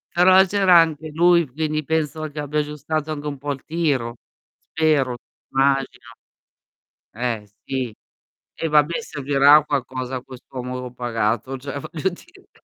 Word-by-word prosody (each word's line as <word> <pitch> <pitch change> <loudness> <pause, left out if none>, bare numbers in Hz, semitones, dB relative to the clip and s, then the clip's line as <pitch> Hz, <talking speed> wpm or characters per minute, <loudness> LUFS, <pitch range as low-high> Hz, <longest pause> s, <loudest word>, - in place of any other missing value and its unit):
Però 185 +2 +7
c'era 190 -2 +5
anche 160 -1 0
lui, 170 -1 +4
quindi 155 +3 -2
penso 155 0 -1
che 150 - -7
abbia 150 +1 -1
aggiustato 150 +1 -3
anche 150 -1 -5
un 145 -2 -4
po' 145 +1 -3
il 135 - -11
tiro. 140 -8 -1 0.5
Spero, 145 -6 +1 0.3
immagino. 135 -2 0 1.0
Eh, 115 -3 -3 0.2
sì. 130 -4 -3 0.6
Eh, 165 - -2
vabbè, 150 +3 +3
servirà 140 - +4
a 155 - +2
qualcosa 130 -2 -3
quest'uomo 125 -1 -7
pagato, 120 +1 -1
cioè 140 +2 -6
voglio 160 +5 -2
dire, 370 - -16
145 Hz, 135 wpm, -22 LUFS, 130-160 Hz, 1.0 s, Però